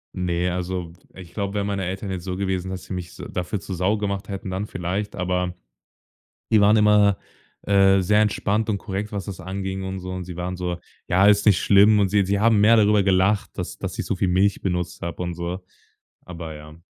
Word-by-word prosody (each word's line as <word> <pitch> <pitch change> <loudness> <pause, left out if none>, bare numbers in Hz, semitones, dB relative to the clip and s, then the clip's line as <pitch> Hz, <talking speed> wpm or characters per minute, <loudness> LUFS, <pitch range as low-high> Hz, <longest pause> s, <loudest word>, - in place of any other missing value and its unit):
Ne, 90 -1 -1
also, 90 -1 -3
w - - -20 0.2
ich 90 -3 -12
glaube, 100 -2 -3
wären 100 -1 -1
meine 100 -2 -2
Eltern 95 +3 -4
jetzt 95 -2 -4
so 90 0 -4
gewesen, 95 -1 -2
dass 95 -1 -6
sie - - -7
mich 90 -1 -5
s - - -12
dafür 90 +3 -3
zur 95 0 -6
Sau 95 +5 +1
gemacht 100 -1 -3
hätten, 100 0 -5
dann 95 +2 -3
vielleicht, 100 +2 -4
aber 90 -1 -1 1.0
die 110 -2 +5
waren 105 +2 +5
immer, 105 -2 +4 0.5
äh, 95 -1 +4
sehr 105 +3 +3
entspannt 105 +1 0
und 105 - +1
korrekt, 100 +1 -5
was 100 -2 -4
das 100 -4 -7
anging 95 0 -4
und 95 0 -4
so. 90 0 -7
Und 90 0 -4
sie 90 -1 -9
waren 90 +1 -3
so: 90 -1 -3 0.3
„Ja, 95 +3 +4
ist 105 0 +4
nicht 105 -4 +5
schlimm“ 105 +1 +5
und 100 -2 +2
sie 100 0 +2
sie 100 +1 0
haben 110 -1 +4
mehr 115 +2 +6
darüber 105 -1 +4
gelacht, 95 +1 +2
dass - - -5
dass - - -6
ich - - -2
so - - -1
viel 95 - 0
Milch 95 +3 +2
benutzt 90 -2 -3
habe 85 +1 -5
und 90 -1 -3
so, 85 +2 -4 0.7
aber 85 -3 -7
ja. 75 0 -11
95 Hz, 225 wpm, -23 LUFS, 90-100 Hz, 1.0 s, mehr